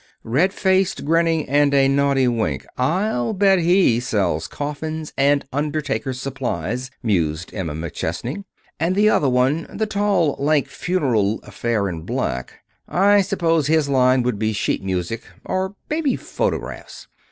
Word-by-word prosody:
"Red 150 +12 +2
faced, 190 -3 +1
grinning, 165 0 +2
and 145 +1 +3
a 135 -1 +5
naughty 135 -1 +2
wink 115 -3 -1
I'll 150 - 0
bet 195 -1 +4
he 175 -8 +3
sells 95 -10 -1
coffins 155 - -5
and 140 0 +2
undertakers' 145 -3 -2
supplies," 125 - -3
mused 85 -7 -1
Emma 85 -7 -4
McChesney. 85 - -4 0.4
"And 170 +3 +1
the 210 +2 +4
other 140 - +2
one 130 +6 +1
the 220 - -1
tall, 200 -7 +1
lank, 145 0 +1
funereal 120 - 0
affair 115 -4 -1
in 85 -3 -5
black 65 -5 -4 0.3
I 200 +3 +4
suppose 165 -6 +1
his 155 -1 +2
line 130 -1 +3
would 120 -4 -1
be 110 0 0
sheet 105 - -1
music, 95 +4 -2 0.2
or 190 +1 -2
maybe 305 -3 0
phonographs. - - -4
140 Hz, 140 wpm, -21 LUFS, 115-175 Hz, 0.4 s, a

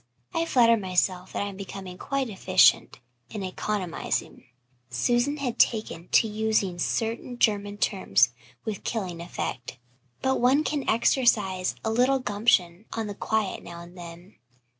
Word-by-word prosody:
I 330 -1 0
flatter 230 -4 +5
myself 185 -1 0
that - - -2
I 205 - -3
am 195 - -10
becoming 190 -2 -8
quite 275 -2 -2
efficient 185 - +3 0.3
in 210 - -5
economizing" 185 -1 -3 0.4
Susan 240 - +1
had 260 -5 -3
taken 215 -6 +1
to 225 - +4
using 215 -4 0
certain 230 +6 -2
German 205 -3 +1
terms 125 - +2 0.3
with 215 -2 -4
killing 185 -7 -3
effect 150 -7 -5 0.5
"but 265 -1 +1
one 265 +5 +4
can 290 -3 -2
exercise 215 -6 +2
a 220 - +1
little 250 +4 +3
gumption 205 -5 +1
on 225 -1 -2
the 205 - -5
quiet 215 -1 -1
now 170 0 -9
and 175 +1 -13
then. 175 +2 -11
205 Hz, 140 wpm, -26 LUFS, 185-235 Hz, 0.5 s, flatter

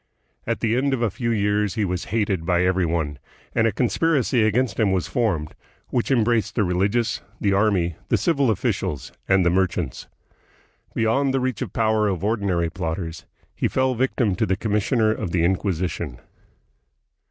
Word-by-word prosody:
At - - -1
the 115 0 +1
end 135 +2 +1
of 120 - -2
a 110 - +1
few 115 +3 -3
years 105 -1 +1
he 110 -3 +1
was 90 0 -2
hated 100 -5 -1
by 90 +1 +2
every 95 -1 +2
one, 75 -4 -2 0.3
and 115 - +3
a - - +1
conspiracy 130 - +1
against 110 0 +1
him 105 -3 +3
was 95 -2 0
formed 85 -11 -1 0.4
which 120 - -1
embraced 120 -3 +2
the 105 - +2
religious, 100 +6 0 0.2
the 100 -1 +1
army, 95 -5 +1
the - - +3
civil 140 -6 +2
officials, 75 - -1 0.2
and 95 -2 +4
the 85 - +4
merchants. 90 -8 -1 0.9
Beyond 130 +5 +2
the - - +2
reach 130 -2 -2
of 125 - -2
the - - -13
power 110 -1 +2
of 95 -3 -2
ordinary 100 -6 0
plotters, 80 -1 -4 0.3
he - - 0
fell 130 0 +1
a - - -2
vic 130 +3 0
tim 110 -6 +2
to - - +1
the 95 0 +1
commissioner 110 +2 +1
of 100 - -3
the 85 -1 +1
Inquisition. 85 -6 -1
105 Hz, 180 wpm, -23 LUFS, 90-115 Hz, 0.9 s, and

